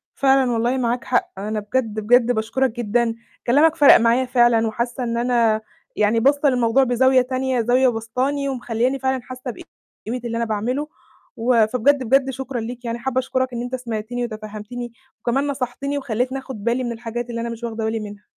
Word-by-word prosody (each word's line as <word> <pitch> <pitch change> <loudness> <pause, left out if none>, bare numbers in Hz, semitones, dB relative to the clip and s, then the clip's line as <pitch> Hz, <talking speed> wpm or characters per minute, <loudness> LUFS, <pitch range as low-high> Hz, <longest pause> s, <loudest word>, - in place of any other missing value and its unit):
فعلًا 270 -2 +3
والله، 240 +3 +1
معاك 240 -1 -1
حق. 245 - 0
أنا 210 +2 -3
بجد، 215 0 -2
بجد 245 +3 +4
باشكرك 230 +3 0
جدًا. 235 0 0 0.3
كلامك 300 +6 +4
فَرَق 290 -3 +8
معايا 235 +3 +2
فعلًا، 240 -2 +3
وحاسّة 240 +3 -3
إن 235 -1 -2
أنا 235 -3 +2 0.3
يعني 215 +2 +2
باصّة 285 +3 +3
للموضوع 245 +1 +3
بزاوية 260 +1 +4
تانية، 255 -1 -1
زاوية 250 +3 +3
بسطاني، 255 +5 -2
ومخلّياني 250 +1 -1
فعلًا 265 -1 -1
حاسّة 255 0 -7
بقيمة 235 +2 -9
اللي 230 0 -2
أنا 235 - 0
باعمله، 240 +7 -2 0.5
و 230 -2 +3
فبجد، 260 +4 +2
بجد 270 +3 +3
شكرًا 265 -1 -4
ليك، 240 +2 -7
يعني 235 0 -3
حابة 260 +1 -1
أشكرك 260 -1 -1
إن 235 - -3
أنت 245 +1 -3
سمعتني، 240 0 -4
وتفهمتني، 215 +2 -7 0.3
وكمان 270 +4 0
نصحتني، 275 +1 -3
وخلّيتني 260 0 -2
آخد 260 -6 -9
بالي 240 +2 0
من 240 - -2
الحاجات 235 +1 -5
اللي 230 -1 -3
أنا 235 - -3
مش 230 +1 -8
واخدة 225 -1 -3
بالي 220 0 -1
منها. 205 -1 -9
245 Hz, 180 wpm, -21 LUFS, 230-260 Hz, 0.5 s, فَرَق